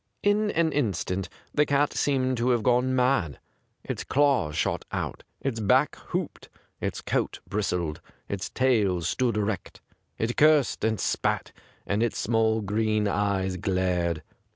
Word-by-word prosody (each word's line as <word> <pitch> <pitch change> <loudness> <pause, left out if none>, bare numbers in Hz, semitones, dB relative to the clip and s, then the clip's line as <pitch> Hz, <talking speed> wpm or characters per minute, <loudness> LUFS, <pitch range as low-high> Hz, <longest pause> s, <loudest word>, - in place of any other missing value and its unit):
In 205 +1 +3
an 165 -4 +1
instant 95 - -1 0.2
the 150 - +4
cat 145 0 +1
seemed 130 -2 +1
to 120 +2 +1
have 120 -3 +2
gone 125 +2 +2
mad. 125 - +1 0.5
Its - - -4
claws 130 - +2
shot - - 0
out, - - -3 0.2
its 130 -5 -2
back 125 +7 +3
hooped, 180 -2 -4 0.3
its - - -3
coat - - -1
bristled, 90 -7 -2 0.3
its 100 -1 -4
tail 110 -9 +2
stood 120 +4 0
erect; 105 -3 -3 0.4
it 115 +2 -2
cursed 150 -3 +4
and 110 -1 +1
spat, - - -1 0.3
and 100 +2 0
its 120 -1 0
small 110 0 +2
green 105 +1 +1
eyes 100 -2 0
glared. 90 -3 0
110 Hz, 140 wpm, -27 LUFS, 100-130 Hz, 0.5 s, the